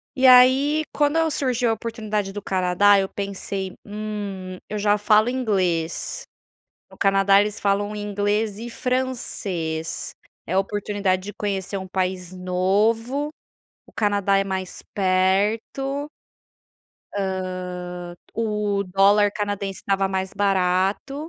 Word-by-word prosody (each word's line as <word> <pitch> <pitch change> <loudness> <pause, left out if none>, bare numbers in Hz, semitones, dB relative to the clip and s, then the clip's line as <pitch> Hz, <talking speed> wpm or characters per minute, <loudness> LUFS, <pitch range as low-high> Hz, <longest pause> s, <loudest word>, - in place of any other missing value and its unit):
E 260 0 +4
aí, 260 +5 +6
quando 295 +1 +2
eu 325 -1 +2
surgiu 250 -4 0
a - - +3
oportunidade 215 -3 -3
do 205 - -5
Canadá 190 +2 +4
eu 190 - -1
pensei: 195 -1 -4
"Hum, 205 -3 -5
eu 210 - -3
já 205 0 +2
falo 215 +3 +4
inglês, 195 - -1 0.6
no - - -17
Canadá 195 0 +4
eles 210 0 -1
falam 205 +1 0
inglês 205 0 -1
e 235 +2 -7
francês, 200 -11 -2 0.3
é 170 - -4
a 190 - +3
oportunidade 200 -2 -1
de 205 +1 -7
conhecer 200 -2 -3
um 190 -1 -6
país 185 -1 -2
novo, 210 +10 0 0.6
o - - -20
Canadá 205 -2 +2
é 195 - +1
mais 190 -1 -4
perto" 205 +9 +1 1.8
"hã, 175 0 -7 0.2
o 210 -3 0
dólar 200 +2 +4
canadense 205 -2 -3
estava 195 0 +1
mais 190 0 -2
barato". 195 +5 +1
205 Hz, 120 wpm, -23 LUFS, 190-220 Hz, 1.8 s, aí